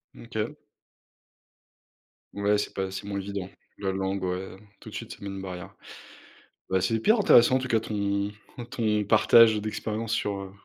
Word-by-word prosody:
Mmh -, -, -12 dB
OK. -, -, -3 dB, 1.8 s
Ouais, 100 Hz, +1 st, +2 dB
c'est 105 Hz, -, -3 dB
pas 95 Hz, -1 st, -2 dB
c'est 95 Hz, -, -6 dB
moins 100 Hz, -1 st, -3 dB
évident, 100 Hz, -1 st, -5 dB, 0.3 s
la 95 Hz, -1 st, -2 dB
langue 95 Hz, 0 st, -2 dB
ouais, 90 Hz, +1 st, -3 dB, 0.2 s
tout -, -, -11 dB
de -, -, -10 dB
suite -, -, -6 dB
ça -, -, -8 dB
met 100 Hz, -, -6 dB
une 95 Hz, -1 st, -5 dB
barrière. 90 Hz, -2 st, -8 dB, 1.0 s
Bah, 95 Hz, 0 st, +2 dB
c'est 95 Hz, +5 st, 0 dB
hyper 215 Hz, -, +4 dB
intéressant, 130 Hz, -, +6 dB
en -, -, +4 dB
tout 130 Hz, -, -4 dB
cas, 115 Hz, -2 st, +2 dB
ton 100 Hz, -2 st, -1 dB, 0.4 s
ton 105 Hz, -5 st, 0 dB
partage 110 Hz, +1 st, +6 dB
d'expérience 110 Hz, +1 st, -3 dB
sur, 100 Hz, -3 st, 0 dB
heu, 95 Hz, -1 st, -8 dB
100 Hz, 175 wpm, -27 LUFS, 95-110 Hz, 1.8 s, intéressant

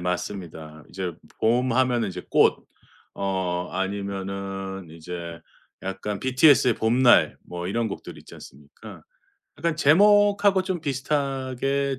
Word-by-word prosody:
맞습니다. 85 Hz, -4 st, -5 dB
이제 95 Hz, -2 st, -4 dB, 0.3 s
봄 125 Hz, +3 st, +2 dB
하면은 120 Hz, -3 st, +1 dB
이제 90 Hz, -1 st, -7 dB
꽃. -, -, +4 dB, 0.6 s
어 90 Hz, -2 st, -2 dB
아니면은 95 Hz, -1 st, -4 dB
이제 85 Hz, 0 st, -8 dB, 0.4 s
약간 95 Hz, +2 st, -4 dB
BTS의 130 Hz, -2 st, +4 dB
봄날. 120 Hz, +2 st, +4 dB
뭐 90 Hz, 0 st, -7 dB
이런 115 Hz, +3 st, -1 dB
곡들 -, -, -8 dB
있지 -, -, -15 dB
않습니까. 70 Hz, +2 st, -13 dB, 0.6 s
약간 165 Hz, -2 st, -1 dB
제목하고 200 Hz, +4 st, +4 dB
좀 185 Hz, -2 st, -3 dB
비슷하게 135 Hz, -1 st, -2 dB
105 Hz, 250 characters per minute, -24 LUFS, 95-135 Hz, 0.6 s, 꽃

